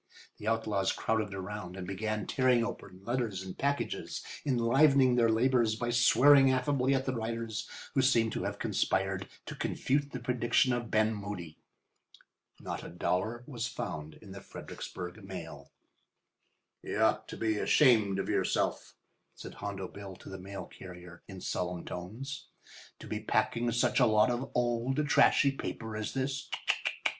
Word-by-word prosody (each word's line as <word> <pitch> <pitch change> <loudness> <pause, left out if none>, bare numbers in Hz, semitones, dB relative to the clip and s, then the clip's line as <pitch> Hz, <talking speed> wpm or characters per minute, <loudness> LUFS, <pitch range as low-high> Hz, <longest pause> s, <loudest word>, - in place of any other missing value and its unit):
The 105 - -7
outlaws 110 -4 +1
crowded 110 -2 -1
around 95 -1 -6
and 95 - -5
began 105 +2 -2
tearing 125 -3 +3
open 95 -5 -8
letters 115 -6 -1
and 95 -1 -7
packages, 140 0 -2 0.2
enlivening 135 +1 +4
their 120 -2 +4
labours 115 -1 +3
by 120 +1 -2
swearing 135 +3 +6
affably 130 0 +2
at 135 0 0
the 130 - -1
writers, 115 -2 -3 0.2
who 135 - +3
seemed 115 -4 +3
to - - -3
have - - -3
conspired 95 0 0 0.2
to - - -6
confute 140 +1 -1
the 125 - -4
prediction 125 +1 +2
of 120 -2 -2
Ben 110 +1 +3
Moody. 100 -6 -6 1.0
Not - - -5
a - - -7
dollar 110 +7 -1
was 120 -5 -3
found 75 -8 -5
in 100 -3 -13
the 100 0 -8
Fredericksburg 90 +2 -8
mail. 80 -7 -8 1.1
"You - - -4
ought - - +2
to - - -7
be 110 -2 0
ashamed 110 -10 +4
of 95 - -2
yourself," - - 0 0.4
said - - -9
Hondo 100 -2 -5
Bill 100 -1 -9
to - - -12
the 95 -1 -7
mail 95 0 -7
carrier 90 -1 -11
in 95 -2 -9
solemn 90 -1 -3
tones, 115 +11 -6 0.5
"to - - -11
be - - -3
packing 120 +1 0
around 120 - +1
such 120 - +2
a 125 - +6
lot 110 +2 +4
of 125 +3 -2
old, 125 +4 +1
trashy 140 -1 +5
paper 110 -4 -5
as 110 +3 -4
this. 135 +1 -2
110 Hz, 155 wpm, -31 LUFS, 95-125 Hz, 1.1 s, swearing